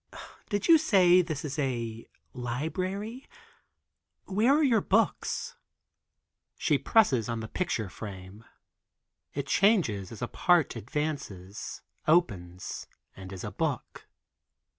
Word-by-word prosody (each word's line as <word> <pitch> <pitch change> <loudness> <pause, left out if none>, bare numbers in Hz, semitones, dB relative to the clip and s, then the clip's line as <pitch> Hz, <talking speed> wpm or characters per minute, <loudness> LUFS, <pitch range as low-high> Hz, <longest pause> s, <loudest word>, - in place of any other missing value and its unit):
"Did 205 -1 -1
you 330 -1 +8
say 185 - +5
this 155 -4 -4
is 150 +1 -4
a 115 -5 -2 0.3
library, 185 - -4 1.0
where 230 +9 +3
are 305 - +4
the 230 -5 +3
books?" 220 +4 0 1.0
She - - +2
presses 135 - +3
on 115 -1 -2
the 110 - -5
picture 125 - -2
frame; 95 +1 -9 0.9
it 140 -1 -2
changes 140 - +2
as 115 0 -7
a - - -1
part 175 -2 +2
advances, 115 - -5 0.2
opens 95 - 0 0.3
and 95 0 -9
is 95 -2 -7
a - - -4
book. - - -3
145 Hz, 115 wpm, -29 LUFS, -, 1.0 s, you